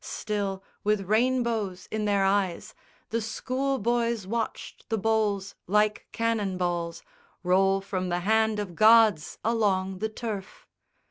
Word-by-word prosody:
Still, 200 -3 -3 0.2
with 210 -1 +2
rainbows 220 -2 0
in 215 -1 -1
their 200 -1 +2
eyes, 195 -3 0 0.4
The 230 +1 0
schoolboys 235 -2 -1
watched 225 +3 -4
the 225 - 0
bowls 210 -2 0
like 210 +2 +1
cannon 220 -5 -1
balls 170 -2 -2 0.4
Roll 195 +2 +3
from 185 -2 -3
the 175 0 -1
hand 220 +2 +2
of 205 -4 -4
gods 215 -4 +5
along 195 -4 0
the 220 +2 -1
turf. 220 - -6
210 Hz, 125 wpm, -27 LUFS, 190-225 Hz, 0.4 s, gods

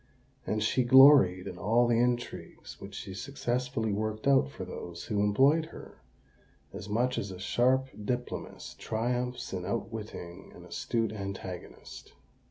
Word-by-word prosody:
And 110 0 0
she 125 +4 +2
gloried 130 -8 +7
in 90 -3 -7
all 115 +6 +3
the 120 -1 +2
intrigues 120 0 -3
which 100 +1 -9
she 100 -1 -7
successfully 120 0 -2
worked 110 +1 -3
out 135 -1 +4
for - - -7
those 85 0 -8
who 105 -3 -1
employed 135 +10 +4
her, 160 - -13 0.7
as 100 - -8
much 125 +4 +1
as 100 - -4
a 95 - -7
sharp 130 +7 +1
diplomatist 125 +2 -5
triumphs 125 +2 -2
in 90 -1 -3
outwitting 110 -4 -6
an - - -12
astute 115 -2 -2
antagonist. 95 -3 -8
115 Hz, 140 wpm, -29 LUFS, 100-125 Hz, 0.7 s, gloried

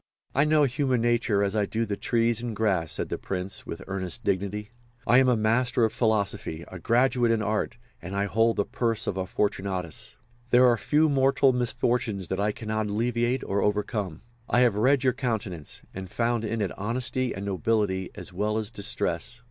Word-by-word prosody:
"I 140 +3 +3
know 155 -1 +4
human 130 -2 +1
nature 115 -3 +2
as 100 +1 -1
I 105 -2 +1
do 115 +1 -1
the 100 -2 -2
trees 115 +1 +1
and 120 -2 -4
grass," 95 -7 0
said - - -3
the - - -3
Prince, 95 0 -3
with 85 - -6
earnest 95 +3 -4
dignity. 100 +2 -2 0.3
"I 125 - +6
am 130 -1 +4
a 125 - +3
master 115 +3 +2
of 110 - -2
philosophy, 105 -8 -1
a 95 - -8
graduate 120 +4 +2
in 115 -2 +2
art, 105 +3 -1 0.2
and 95 +2 -6
I 100 0 +1
hold 115 +3 +2
the 100 - 0
purse 115 -3 -1
of - - -2
a 95 -1 -3
Fortunatus. 95 -5 -3 0.3
There 125 +1 +6
are 120 -1 +5
few 150 +7 +2
mortal 135 -1 +3
misfortunes 120 -5 -1
that 95 - -2
I 105 +1 +1
cannot 110 -1 -3
alleviate 120 +4 0
or 100 +1 -1
overcome. 105 -4 -1 0.3
I 125 - +4
have 120 -4 +4
read 130 +6 +3
your 130 -1 +3
countenance, 110 - -4
and 95 -1 -7
found 115 +2 0
in 115 0 -2
it 95 - -3
honesty 125 +4 -1
and 95 +2 -5
nobility 95 0 0
as 95 - -8
well 105 +3 0
as 110 0 -1
distress. 100 0 -1
110 Hz, 190 wpm, -26 LUFS, 100-120 Hz, 0.3 s, I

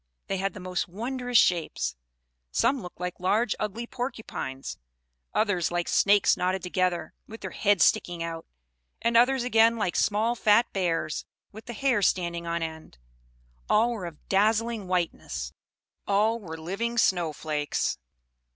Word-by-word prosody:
They 195 - -2
had 195 +2 -2
the - - -7
most 185 -1 -2
wondrous 245 +6 -1
shapes; 155 - +2 0.5
some 260 - +1
looked 180 -2 -10
like 180 0 -4
large 210 +5 +2
ugly 215 +3 -3
porcupines; 230 - -5 0.5
others 200 -6 +1
like 175 0 -1
snakes 205 0 +4
knotted 185 +1 -1
together, 180 -2 -1
with 225 +1 -10
their - - -5
heads 205 -3 +3
sticking 175 -1 +2
out; 165 -1 -6 0.6
and 235 0 +1
others, 250 +2 +5
again, 230 -1 +4
like 185 -6 -1
small 220 +3 +2
fat 225 0 +4
bears, 170 -5 -1 0.2
with 220 +2 -11
the 240 - -5
hair 250 -2 +1
standing 170 -2 0
on 170 0 -1
end: 160 - -7 0.7
all 230 +3 +4
were 205 -7 -4
of 160 -3 -12
dazzling 215 +1 +1
whiteness 175 - -2 0.5
all 215 +3 +2
were 165 -6 -8
living 200 +9 -3
snow 175 -7 +3
flakes. 150 - -2
195 Hz, 145 wpm, -27 LUFS, 170-225 Hz, 0.7 s, others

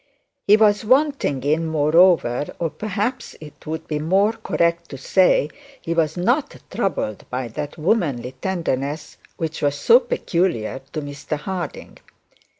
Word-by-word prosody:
He 210 +1 +7
was 210 -1 +3
wanting 260 - +2
in, 155 +3 +1
moreover, 155 -3 +3
or 165 -2 -2
perhaps 215 +4 -3
it 155 0 -13
would 160 +1 -5
be 150 -1 -2
more 195 +8 +2
correct 170 -6 -1
to 135 - -7
say, 155 +1 +3 0.3
he 165 - -3
was 160 -1 0
not 250 - 0 0.2
troubled 195 - -2
by 125 -1 -3
that 145 +7 -6
womanly 155 - 0
tenderness 145 -1 -3 0.2
which 160 -1 -4
was 145 -1 +1
so 230 +12 +6
peculiar 170 - -1
to 155 - -3
Mr 145 +1 -5
Harding. 180 +3 -6
165 Hz, 140 wpm, -21 LUFS, 145-195 Hz, 0.3 s, He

